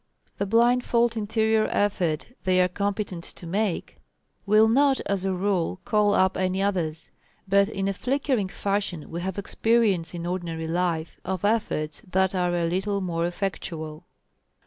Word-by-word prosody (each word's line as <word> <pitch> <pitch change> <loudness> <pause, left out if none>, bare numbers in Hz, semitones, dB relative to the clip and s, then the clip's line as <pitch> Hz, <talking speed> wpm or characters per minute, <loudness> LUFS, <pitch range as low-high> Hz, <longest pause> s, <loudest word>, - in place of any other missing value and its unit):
The 200 - 0
blindfold 235 +1 +3
interior 220 0 +1
effort 180 -6 0 0.2
they 185 -1 +3
are 180 - +5
competent 200 -1 -3
to 175 - -9
make, 195 +2 -2 0.5
will 215 +2 +6
not, 270 +4 +4
as 195 -1 -2
a 190 - +1
rule, 185 -1 0
call 210 -1 +3
up 190 0 +3
any 185 0 0
others. 170 -6 -1 0.4
But 200 +1 +4
in 195 -3 -2
a 195 - 0
flickering 255 -3 0
fashion 195 -5 -2
we 170 +1 -4
have 190 +1 -4
experience 200 -4 +1
in 170 0 -5
ordinary 170 -2 -3
life 165 -1 -1
of 190 0 -2
efforts 205 -8 0
that 190 +1 +2
are 180 -1 +1
a 170 -1 +1
little 190 +4 0
more 170 -3 -1
effectual. 170 -3 -5
190 Hz, 150 wpm, -25 LUFS, 175-210 Hz, 0.5 s, will